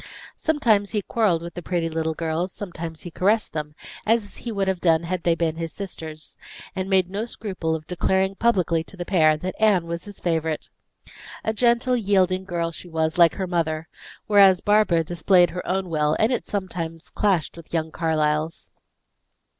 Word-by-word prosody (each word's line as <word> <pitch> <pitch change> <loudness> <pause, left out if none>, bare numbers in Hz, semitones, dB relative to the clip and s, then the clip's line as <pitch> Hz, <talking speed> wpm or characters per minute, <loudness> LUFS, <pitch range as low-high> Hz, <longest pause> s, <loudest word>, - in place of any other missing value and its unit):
Sometimes 225 -11 +2
he 210 -2 0
quarreled 190 -8 +1
with 170 - -7
the 175 - -6
pretty 170 -1 -1
little 160 0 -2
girls, 165 +3 -2
sometimes 170 -5 -7
he 175 - -8
caressed 210 +6 +1
them, 150 -1 -4 0.3
as 215 -2 0
he 235 - -5
would 200 -2 -1
have 190 -2 -1
done 165 -2 +3
had 180 +1 -2
they 170 0 +2
been 160 -1 -1
his 165 -1 -4
sisters; 160 -5 -7 0.4
and 190 0 -2
he - - -7
made 190 -2 +3
no 200 +4 -3
scruple 185 -8 -3
of 155 -1 -7
declaring 190 +2 +1
publicly 185 -7 +1
to 195 - -12
the 175 - -4
pair 155 -5 +4
that 185 +4 -4
Anne 205 -6 +4
was 170 0 -5
his 205 -2 -10
favorite. 160 -2 -1 0.7
A 220 - 0
gentle, 240 +2 +2
yielding 190 -4 +2
girl 170 -2 -2
she 175 +2 -9
was, 160 0 -1
like 170 -1 +6
her 190 - -2
mother; 165 -2 -1 0.4
whereas 195 -3 +6
Barbara 205 -6 +3
displayed 175 +2 +3
her 180 +1 -5
own 190 0 -1
will, 150 -2 +1
and 220 +3 +2
it 245 - -1
sometimes 170 -5 -4
clashed 190 -7 +1
with 170 -1 -13
young 160 -1 -1
Carlyle's. 155 -1 -1
175 Hz, 185 wpm, -24 LUFS, 160-200 Hz, 0.7 s, like